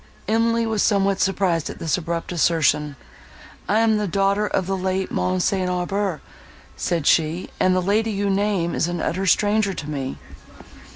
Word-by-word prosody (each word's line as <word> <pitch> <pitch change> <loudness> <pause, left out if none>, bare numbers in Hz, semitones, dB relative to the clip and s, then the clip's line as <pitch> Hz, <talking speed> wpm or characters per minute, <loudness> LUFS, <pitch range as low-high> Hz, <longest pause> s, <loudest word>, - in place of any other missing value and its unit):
Emily 230 +1 +2
was 220 -2 0
somewhat 195 -2 +2
surprised 185 -4 +1
at - - -7
this 160 - 0
abrupt 170 -1 -4
assertion. 155 -3 +1 0.7
"I 215 +2 +3
am 220 -1 +3
the 210 - -1
daughter 200 +3 +1
of 190 - -1
the 195 +1 -1
late 190 0 -2
Mons. 185 0 0
St. 185 -2 0
Aubert," 180 -1 -2 0.5
said 170 -4 -2
she; 165 +4 +1
"and 185 0 +3
the 185 - +1
lady 215 +4 +1
you 205 -1 -1
name 195 -3 0
is 165 - 0
an 175 0 -3
utter 190 +4 -2
stranger 205 0 +2
to 145 - -6
me." 135 -3 -4
190 Hz, 170 wpm, -22 LUFS, 170-205 Hz, 0.7 s, I